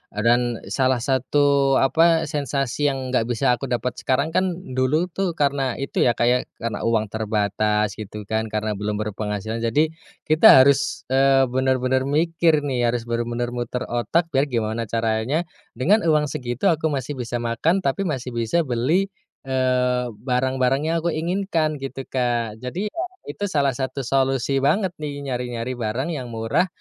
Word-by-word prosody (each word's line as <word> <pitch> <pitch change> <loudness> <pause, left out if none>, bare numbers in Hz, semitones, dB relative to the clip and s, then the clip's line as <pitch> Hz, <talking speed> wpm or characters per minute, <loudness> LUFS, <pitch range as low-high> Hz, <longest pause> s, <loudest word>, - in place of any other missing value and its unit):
Eee, 105 - -2
dan 120 0 +3 0.2
salah 130 0 +1
satu 140 +1 +2
apa, 165 +5 +4
sensasi 145 -2 -1
yang 130 -2 -2
nggak 115 -3 +1
bisa 120 0 +1
aku 130 +2 -1
dapat 120 0 -1
sekarang 140 +5 0
kan, 185 0 +1 0.2
dulu 150 +8 +1
tuh 180 -2 -2
karena 140 -4 0
itu 135 - -4
ya, 120 - +3
Kak, 120 - +1
ya, 125 - +4 0.3
karena 115 - -2
uang 110 -3 0
terbatas 105 -1 0
gitu 105 0 -7
kan, 110 +2 -2
karena 110 0 -2
belum 105 +1 -3
berpenghasilan. 110 +1 -4
Jadi, 145 +8 +1 0.3
kita 155 -4 +7
harus, 140 +1 +1
eee, 135 0 +4
bener-bener 130 0 +1
mikir 160 0 +2
nih, 125 -4 0
harus 120 0 -1
bener-bener 120 +1 -2
muter 120 0 -3
otak, 160 +8 -1
biar 140 +1 +2
gimana 115 -2 -2
caranya 115 +8 0 0.3
dengan 175 - +3
uang 150 -3 +2
segitu 125 -1 0
aku 160 0 0
masih 140 -2 -3
bisa 120 0 -4
makan 120 +11 0
tapi 180 +8 0
masih 130 -4 -3
bisa 120 +9 0
beli, 155 +10 0 0.3
eee, 125 -1 +1 0.2
barang-barang 130 +2 +1
yang 165 - +1
aku 170 - +1
inginkan 165 -2 -1
gitu, 135 0 -6
Kak. 120 -3 -2
Jadi 180 +12 -3
ya, 335 - -5 0.2
itu 200 +8 -4
salah 140 -6 +1
satu 130 +2 -4
solusi 135 +1 +1
banget 185 +7 +1
nih, 145 -1 -5
nyari-nyari 125 -1 -4
barang 120 +9 -2
yang 130 -6 -4
murah 115 +9 0
130 Hz, 160 wpm, -22 LUFS, 120-145 Hz, 0.3 s, kita